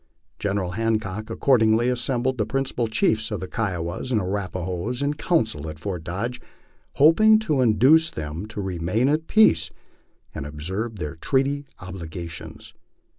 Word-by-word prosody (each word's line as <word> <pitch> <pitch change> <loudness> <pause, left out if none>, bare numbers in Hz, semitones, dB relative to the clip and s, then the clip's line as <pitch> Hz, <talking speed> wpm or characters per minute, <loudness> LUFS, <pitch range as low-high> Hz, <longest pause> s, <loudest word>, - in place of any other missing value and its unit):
General 100 -3 -1
Hancock 110 0 -2
accordingly 115 -3 +3
assembled 125 +1 0
the 105 - +2
principal 130 -1 -1
chiefs 110 0 +1
of 105 - -3
the 95 - -5
Kiowas 95 0 -3
and 115 - +3
Arrapahoes 95 +4 -3
in 145 +1 +1
council 110 - 0
at 75 - -8
Fort 90 -1 -5
Dodge, 115 +9 -4 0.5
hoping 215 +9 +6
to 155 -11 0
induce 130 +8 +5
them 80 - -6
to 110 -1 -5
remain 95 +6 0
at 155 +3 0
peace 85 - +4 0.6
and 70 - -5
observe 95 +10 -3
their 75 -7 -5
treaty 140 - 0
obligations. 85 -2 -8
110 Hz, 135 wpm, -24 LUFS, 90-130 Hz, 0.6 s, hoping